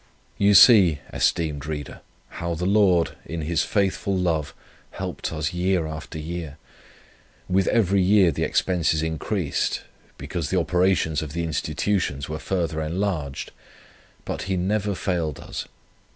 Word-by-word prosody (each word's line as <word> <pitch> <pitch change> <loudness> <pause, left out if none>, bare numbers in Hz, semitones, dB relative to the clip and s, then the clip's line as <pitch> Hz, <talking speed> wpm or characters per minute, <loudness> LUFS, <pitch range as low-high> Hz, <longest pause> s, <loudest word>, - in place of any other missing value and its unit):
"You 100 0 +5
see, 95 - +8 0.2
esteemed 75 -4 0
reader, 75 -3 -6 0.4
how 85 0 -2
the 90 +2 -3
Lord, 95 -4 +3
in 85 0 -5
His 80 +1 0
faithful 100 -1 0
love 80 -5 0 0.4
helped - - -5
us 75 +1 -2
year 90 -1 +1
after 80 0 -7
year. 80 -2 -6 0.9
With 95 +1 +2
every 100 -4 +3
year 95 -1 +5
the - - -4
expenses 80 -4 +1
increased, 80 +1 -1 0.4
because 80 -4 -4
the 95 - +2
operations 90 -3 +1
of 75 -2 -6
the 85 0 -2
Institutions 80 -2 -1
were 80 0 -5
further 85 -4 -2
enlarged; 80 -4 -3 0.7
but - - -4
He 95 - +1
never 100 +2 0
failed 85 -6 -2
us. - - -6
85 Hz, 135 wpm, -24 LUFS, 80-95 Hz, 0.9 s, see